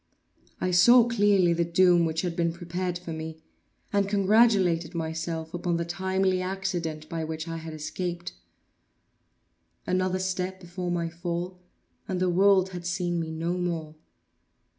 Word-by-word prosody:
I 185 - 0
saw 240 +7 +7
clearly 205 -6 +3
the 170 0 +1
doom 175 0 +4
which 160 0 -1
had 175 -2 -2
been 170 -1 +1
prepared 175 +1 -3
for 175 -2 -7
me, 160 0 -6 0.5
and 200 -1 +2
congratulated 195 -5 +3
myself 160 0 -3
upon 175 -1 -1
the 170 - -2
timely 190 +1 0
accident 180 -5 -3
by 165 0 -3
which 160 +1 -5
I 165 0 -4
had 160 -1 -7
escaped. 175 +3 -4 1.5
Another 185 0 0
step 185 0 -2
before 180 0 -5
my 170 -1 -1
fall, 175 +2 -4 0.5
and 185 -1 -2
the 185 -1 +2
world 190 +1 +4
had 175 -2 -6
seen 175 -1 -1
me 165 -1 -3
no 165 +2 -2
more. 165 -3 -3
175 Hz, 145 wpm, -27 LUFS, 165-185 Hz, 1.5 s, saw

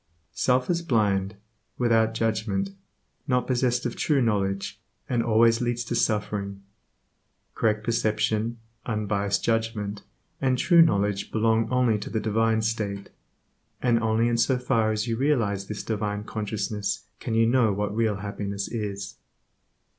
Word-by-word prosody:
Self 125 0 +1
is 170 -1 0
blind, 105 - +1 0.4
without 115 -2 +2
judgment, 110 -3 -1 0.6
not 125 0 +1
possessed 125 -1 +1
of 120 - -2
true 150 -3 +1
knowledge, 100 -5 -1 0.3
and 120 -2 +1
always 115 0 +4
leads 120 0 -1
to 120 0 -3
suffering. 105 -3 -1 0.9
Correct 110 -1 0
perception, 110 0 0 0.3
unbiased 100 -3 -1
judgment, 110 -3 -1 0.4
and 130 -2 +2
true 170 +5 +5
knowledge 100 -10 +2
belong 110 0 +2
only 125 -4 +2
to - - -6
the 110 - -1
divine 110 +1 +1
state, 105 -3 -3 0.7
and 120 -2 +2
only 110 +1 +2
in 120 0 +1
so 125 +3 +2
far 115 -3 +1
as 105 +2 -1
you 115 -1 -1
realize 115 -8 +1
this 105 - -5
divine 105 -2 -2
consciousness 105 -1 -3 0.2
can 115 - -3
you 115 0 +4
know 120 -2 +3
what 105 +1 -2
real 110 -2 +1
happiness 100 0 -4
is. 100 -3 -5
110 Hz, 140 wpm, -26 LUFS, 105-115 Hz, 0.9 s, true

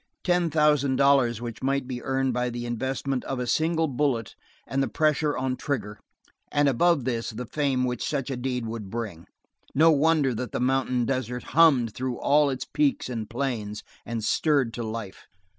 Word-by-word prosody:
Ten 175 -2 +2
thousand 150 -3 +3
dollars 130 -4 +3
which 120 -2 -6
might 135 0 0
be 125 -2 -5
earned 135 0 0
by 125 0 0
the 120 0 -5
investment 130 +2 -2
of 135 - -3
a 125 - -1
single 160 +5 +1
bullet 130 -5 -1 0.3
and 135 - -1
the 135 - +1
pressure 155 -1 +1
on 130 0 -1
trigger; 105 -7 -4 0.5
and 145 0 +3
above 140 +1 +3
this 115 -3 -1
the 120 +3 -6
fame 135 -1 0
which 125 -2 -2
such 140 -2 -2
a - - -1
deed 125 -1 -3
would 110 -3 -6
bring 105 -7 -5 0.5
no 160 +3 +6
wonder 150 -3 +3
that 125 +2 -5
the - - -1
mountain 125 -1 +1
desert 125 -1 -2
hummed 140 -9 +5
through 130 -1 -3
all 145 0 +3
its 130 -2 -3
peaks 285 - 0
and 115 -4 -4
plains, 115 -5 -3 0.2
and 115 -2 -4
stirred 140 -1 +2
to 120 - -4
life. 110 -3 -6
130 Hz, 180 wpm, -26 LUFS, 120-145 Hz, 0.5 s, no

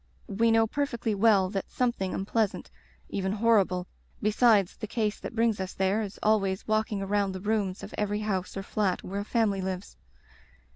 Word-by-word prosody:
We 225 +3 +1
know 225 0 +4
perfectly 235 -3 -2
well 200 -3 +4
that 195 -2 -3
something 235 -7 -1
unpleasant 210 +1 -1 0.2
— - - -32
even 190 0 -1
hor 220 -1 +4
rible 180 -1 -4 0.2
— - - -35
besides 210 -2 +4
the 215 - -5
case 215 -1 -1
that - - -7
brings 230 -2 +2
us 190 -1 -4
there, 195 +3 +1
is 205 -2 -6
always 195 -3 +1
walking 215 -2 0
around 200 0 0
the 190 - -5
rooms 205 -2 -1
of 205 - -8
every 210 0 -1
house 195 -3 -2
or 195 - -3
flat 195 -2 -1
where 195 +2 -4
a - - -4
family 210 -3 +1
lives. 185 0 -5
205 Hz, 190 wpm, -28 LUFS, 195-220 Hz, 0.2 s, know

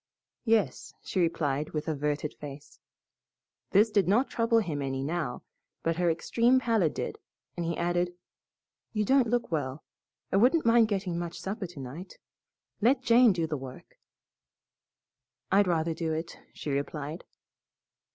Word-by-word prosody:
"Yes," 225 -3 +1
she 190 - -2
replied 150 -4 0
with 155 -1 -3
averted 150 -1 -1
face. 145 -1 -10 0.9
This 215 +3 +4
did 200 -4 +3
not 230 +8 +3
trouble 230 0 +2
him 160 -10 0
any 135 -1 -2
now, 155 -4 -3 0.4
but 165 0 0
her 175 -1 +2
extreme 235 +10 +3
pallor 225 -9 +2
did - - -5 0.4
and 170 -1 -3
he 170 - -2
added, 175 +1 0 0.8
"You 210 -1 0
don't 265 +1 +4
look 240 -4 0
well. 145 -2 -2 0.5
I - - +3
wouldn't 255 +9 +4
mind 230 -1 +5
getting 190 -5 -2
much 170 -1 -5
supper 195 0 -4
tonight. 155 +2 -9 0.6
Let 255 +4 +3
Jane 240 -1 +6
do 170 -3 0
the 155 -2 -3
work." 130 -1 -11 1.5
"I'd 200 0 +5
rather 165 -1 +1
do 160 0 -2
it," 165 +2 -4 0.2
she 150 - -5
replied. 145 +3 -3
175 Hz, 140 wpm, -29 LUFS, 150-220 Hz, 1.5 s, Jane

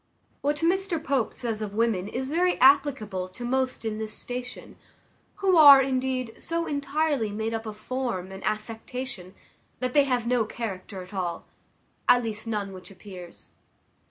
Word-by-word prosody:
What 290 +1 +1
Mr 365 +1 +2
Pope 265 -5 0
says 225 -3 -4
of 205 -1 -4
women 220 -4 +1
is 260 +5 -3
very 355 +3 +2
applicable 255 -9 +3
to 240 +6 -8
most 260 -1 -1
in 215 -1 -2
this 215 -1 -4
station, 250 +2 -7 0.6
who 390 -2 +2
are, 285 -3 +11
indeed, 260 -2 -1
so 335 0 -1
entirely 285 -5 0
made 220 +2 -2
up 225 0 -4
of 210 -1 -6
form 225 -6 -3
and 190 0 -9
affectation, 220 -2 -4 0.4
that 255 -1 -2
they 285 -2 +5
have 250 -3 0
no 240 -1 +2
character 200 -4 -6
at 180 - -15
all, 175 -3 -3 0.6
at 245 0 +6
least 220 0 -5
none 205 -3 -2
which 185 +2 -11
appears. 185 -2 -11
235 Hz, 155 wpm, -26 LUFS, 210-270 Hz, 0.6 s, are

